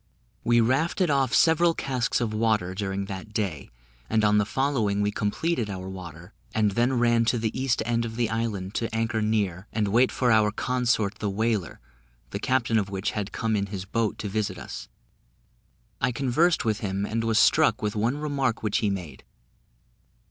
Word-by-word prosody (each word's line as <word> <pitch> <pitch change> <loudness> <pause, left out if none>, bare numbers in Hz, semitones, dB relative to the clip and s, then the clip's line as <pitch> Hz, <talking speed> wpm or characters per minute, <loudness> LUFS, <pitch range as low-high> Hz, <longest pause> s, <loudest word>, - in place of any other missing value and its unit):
We 120 0 +4
rafted 155 - +1
off 135 -3 +2
several 165 +3 +4
casks 130 -3 -1
of 115 -3 -2
water 110 -4 +1
during 100 0 -3
that 100 +2 -7
day, 95 -11 -3 0.4
and 110 -1 +2
on 105 0 +4
the 105 - 0
following 120 -7 0
we 105 0 +1
completed 110 +4 -1
our 95 -1 -5
water, 90 0 -9 0.2
and 105 -2 +3
then 120 +5 +1
ran 120 -1 +3
to 115 +2 +2
the 110 -1 -2
east 130 -3 0
end 115 0 0
of 115 -1 -5
the 120 -1 +1
island 105 -4 -3
to 115 - -2
anchor 115 -1 0
near, 105 -3 -1
and 105 -3 0
wait 120 +5 +4
for 125 -2 +1
our 110 -1 +4
consort 115 -2 0
the 105 - -1
whaler, 105 -2 -1 0.5
the 100 - -3
captain 115 -2 +1
of 100 -2 -3
which 95 -1 -2
had 105 -2 -4
come 110 -1 -1
in 100 -1 -1
his 95 -2 -6
boat 110 +2 -1
to 105 - -4
visit 105 -2 -2
us: - - -8 1.1
I 125 - +2
conversed 140 +7 +1
with 110 -1 0
him, 100 -2 -2
and 115 +2 -2
was 115 -1 +1
struck - - +4
with 105 +1 -1
one 115 +6 0
remark 140 -6 -1
which 105 -2 +1
he 105 - +1
made. 90 -8 -5
110 Hz, 185 wpm, -26 LUFS, 100-120 Hz, 1.1 s, We